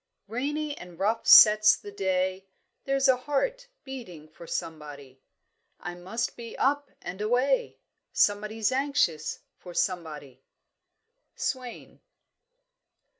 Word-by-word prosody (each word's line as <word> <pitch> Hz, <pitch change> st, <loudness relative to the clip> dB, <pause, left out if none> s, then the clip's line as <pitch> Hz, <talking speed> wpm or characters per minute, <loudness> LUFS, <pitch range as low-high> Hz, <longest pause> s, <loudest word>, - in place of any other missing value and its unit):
"Rainy 290 Hz, +6 st, -3 dB
and 175 Hz, -1 st, -12 dB
rough 215 Hz, +5 st, -1 dB
sets 215 Hz, 0 st, +9 dB
the 205 Hz, -, -10 dB
day 190 Hz, -1 st, -1 dB, 0.4 s
There's 275 Hz, 0 st, +2 dB
a 260 Hz, -1 st, +4 dB
heart 480 Hz, -, -2 dB, 0.2 s
beating 225 Hz, -, -9 dB
for 165 Hz, +2 st, -14 dB
somebody; 145 Hz, -6 st, -7 dB, 0.6 s
I 175 Hz, -, -6 dB
must 190 Hz, +7 st, -4 dB
be 235 Hz, -1 st, -9 dB
up 285 Hz, +1 st, +1 dB
and 190 Hz, +3 st, -6 dB
away, 255 Hz, -, +1 dB, 0.3 s
Somebody's 210 Hz, +2 st, +1 dB
anxious 265 Hz, -, 0 dB, 0.2 s
for 175 Hz, -1 st, -11 dB
somebody." 150 Hz, -8 st, -3 dB, 0.9 s
SWAIN. 255 Hz, -3 st, -5 dB
210 Hz, 105 wpm, -27 LUFS, 175-265 Hz, 0.9 s, sets